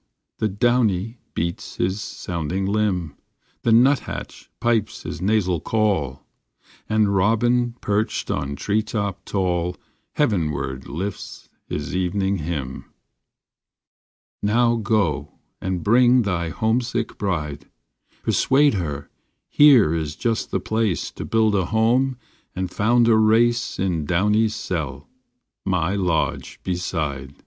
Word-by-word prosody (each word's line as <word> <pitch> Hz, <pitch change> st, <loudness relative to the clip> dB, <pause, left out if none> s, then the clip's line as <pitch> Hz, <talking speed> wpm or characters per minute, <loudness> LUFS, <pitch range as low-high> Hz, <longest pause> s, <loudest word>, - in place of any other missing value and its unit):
The 110 Hz, -, +2 dB
Downy 115 Hz, 0 st, +1 dB, 0.2 s
beats 85 Hz, +1 st, -3 dB
his 95 Hz, +3 st, -1 dB
sounding 90 Hz, +1 st, -3 dB
limb, 95 Hz, -7 st, -1 dB, 0.4 s
The 115 Hz, -, +1 dB
nuthatch 125 Hz, +5 st, +1 dB
pipes 115 Hz, -3 st, 0 dB
his -, -, -6 dB
nasal 95 Hz, -4 st, +1 dB
call, 95 Hz, -12 st, 0 dB, 0.6 s
And 105 Hz, -2 st, +2 dB
robin 120 Hz, +4 st, +2 dB
perched 105 Hz, +1 st, -1 dB
on 70 Hz, +1 st, -2 dB
treetop 100 Hz, +2 st, -2 dB
tall 90 Hz, -2 st, -1 dB, 0.4 s
Heavenward 75 Hz, -, -1 dB
lifts 95 Hz, +6 st, -6 dB, 0.2 s
his 75 Hz, +4 st, -4 dB
evening 95 Hz, +2 st, 0 dB
hymn. 75 Hz, -5 st, -4 dB, 1.6 s
Now 115 Hz, +3 st, +3 dB
go 100 Hz, -, 0 dB, 0.3 s
and 95 Hz, -3 st, -2 dB
bring 125 Hz, +3 st, +5 dB
thy 85 Hz, -5 st, -1 dB
homesick 115 Hz, +4 st, -1 dB
bride, 75 Hz, -8 st, -3 dB, 0.5 s
Persuade 140 Hz, +1 st, +3 dB
her 75 Hz, -7 st, -3 dB, 0.4 s
here 130 Hz, -, +6 dB
is 80 Hz, -3 st, -2 dB
just 115 Hz, -1 st, -1 dB
the -, -, -1 dB
place 110 Hz, -4 st, -1 dB
To -, -, -7 dB
build 110 Hz, -1 st, +2 dB
a 95 Hz, -3 st, +2 dB
home 120 Hz, +6 st, +2 dB, 0.4 s
and 95 Hz, -1 st, -3 dB
found 120 Hz, +3 st, +3 dB
a 115 Hz, -, +5 dB
race 115 Hz, +2 st, +3 dB
In 85 Hz, -5 st, -1 dB
Downy 105 Hz, +7 st, +2 dB
s 110 Hz, 0 st, -2 dB
cell, 75 Hz, -9 st, -4 dB, 0.6 s
my 90 Hz, -1 st, 0 dB
lodge 90 Hz, -5 st, -1 dB
beside. 75 Hz, -7 st, -3 dB
100 Hz, 115 wpm, -22 LUFS, 85-110 Hz, 1.6 s, here